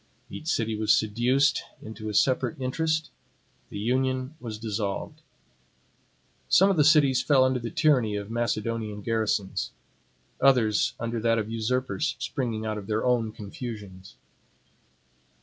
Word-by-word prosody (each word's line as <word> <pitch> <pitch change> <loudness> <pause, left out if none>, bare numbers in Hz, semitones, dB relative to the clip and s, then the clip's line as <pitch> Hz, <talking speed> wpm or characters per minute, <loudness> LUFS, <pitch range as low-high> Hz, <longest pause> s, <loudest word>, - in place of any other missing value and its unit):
Each 155 - -8
city 115 -8 0
was 110 0 +3
seduced 125 +7 +2 0.2
into 110 0 -7
a 105 - -4
separate 135 +6 +2
interest; 155 +4 -1 0.6
the - - -7
union 130 +4 0
was 110 -5 -6
dissolved. 105 -2 -4 1.3
Some 195 +2 +6
of - - +1
the 150 - +5
cities 145 -4 +5
fell 135 -3 +4
under 130 -1 +1
the 115 -1 -5
tyranny 135 -9 +2
of 105 +1 -5
Macedonian 115 -2 -2
garrisons; 110 -3 -1 0.7
others 125 -6 +3
under 115 0 -2
that 115 +1 +2
of 110 0 -2
usurpers 125 +6 -1
springing 115 -6 -3
out 110 -1 -2
of 100 - -10
their 110 +2 -1
own 120 -3 +1
confusions. 100 -3 -8
115 Hz, 130 wpm, -26 LUFS, 110-130 Hz, 1.3 s, Some